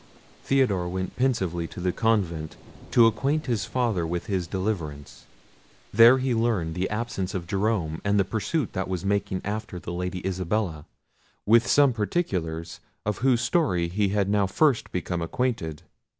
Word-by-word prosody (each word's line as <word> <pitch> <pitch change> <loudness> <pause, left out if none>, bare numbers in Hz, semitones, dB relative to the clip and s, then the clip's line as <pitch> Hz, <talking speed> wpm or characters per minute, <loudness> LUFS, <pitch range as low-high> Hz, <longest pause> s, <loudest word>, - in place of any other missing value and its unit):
Theodore 105 -10 +1
went 95 +1 -4
pensively 95 -10 0
to - - -10
the 90 0 0
convent, 90 -9 0 0.3
to 120 - +6
acquaint 140 +7 +1
his 120 -5 -1
father 115 -10 0
with 85 +1 -3
his 95 -5 -2
deliverance. 85 -7 -4 0.7
There 115 +4 +8
he 130 -1 0
learned 110 -8 0
the 90 +3 -2
absence 105 -3 -3
of 90 -3 -3
Jerome, 95 -4 -1
and 100 0 +2
the 95 - +3
pursuit 110 - -2
that 95 - -2
was 95 -1 -3
making 100 -1 0
after 105 -2 -4
the 85 0 -6
Lady 90 +1 -4
Isabella, 90 -3 -2 0.6
with 115 +2 +5
some 140 -3 +5
particulars 90 - -2 0.3
of 105 -1 -1
whose 125 -2 +3
story 120 - +1
he 100 +3 +1 0.2
now 100 0 +1
first 135 +5 +2
became 90 -1 -2
acquainted. 85 - -2
100 Hz, 150 wpm, -26 LUFS, 90-115 Hz, 0.7 s, There